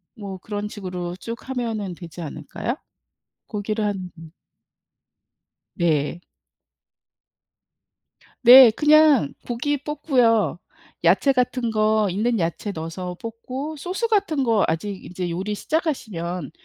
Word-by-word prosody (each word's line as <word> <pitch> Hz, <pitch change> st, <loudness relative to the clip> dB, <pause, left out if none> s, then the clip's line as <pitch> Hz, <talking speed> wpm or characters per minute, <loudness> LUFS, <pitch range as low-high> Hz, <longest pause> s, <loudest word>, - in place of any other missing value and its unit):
뭐 200 Hz, -4 st, -7 dB
그런 205 Hz, +2 st, -5 dB
식으로 180 Hz, -4 st, -5 dB
쭉 230 Hz, +6 st, -8 dB
하면 225 Hz, -7 st, -3 dB
되지 170 Hz, 0 st, -10 dB
않을까요? 155 Hz, -, -5 dB, 0.7 s
고기를 210 Hz, 0 st, -3 dB
한 195 Hz, -3 st, -3 dB
음. 165 Hz, -1 st, -12 dB, 1.4 s
네. 160 Hz, -2 st, 0 dB, 2.2 s
네. 245 Hz, 0 st, +10 dB
그냥 300 Hz, -, +5 dB
고기 245 Hz, +5 st, -1 dB
볶고요. 250 Hz, -, +1 dB, 0.4 s
야채 190 Hz, +11 st, +4 dB
같은 250 Hz, -2 st, 0 dB
거, 215 Hz, -1 st, +2 dB
있는 220 Hz, +5 st, 0 dB
야채 170 Hz, +4 st, -2 dB
넣어서 180 Hz, +1 st, -6 dB
볶고 255 Hz, +7 st, -6 dB
소스 370 Hz, +9 st, -2 dB
같은 395 Hz, -10 st, +1 dB
거 225 Hz, -5 st, +3 dB
아직 190 Hz, +5 st, -3 dB
인제 180 Hz, 0 st, -4 dB
요리 190 Hz, +5 st, -3 dB
시작하시면 195 Hz, -, -3 dB
215 Hz, 215 characters per minute, -23 LUFS, 180-255 Hz, 2.2 s, 네